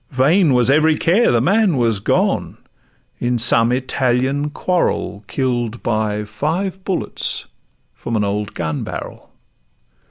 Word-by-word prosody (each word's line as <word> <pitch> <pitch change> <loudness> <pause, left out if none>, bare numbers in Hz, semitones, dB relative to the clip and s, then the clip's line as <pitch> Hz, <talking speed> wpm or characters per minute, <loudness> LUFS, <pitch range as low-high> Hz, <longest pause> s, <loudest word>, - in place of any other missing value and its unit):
vain 145 +3 +3
was 125 +1 +4
every 155 +2 +3
care; 200 +8 +3
The 120 - +3
man 195 - +2
was 115 -4 +1
gone: - - 0 0.6
in 120 0 0
some 115 0 +3
Italian 130 +2 0
quarrel 150 - -1
Kill'd 120 0 -2
by 110 -2 -1
five 170 - -3
bullets 190 -2 -2 0.5
from 115 - -5
an 105 - +1
old 100 +1 -3
gun 80 -3 -3
barrel. - - -8
125 Hz, 125 wpm, -19 LUFS, 110-160 Hz, 0.6 s, was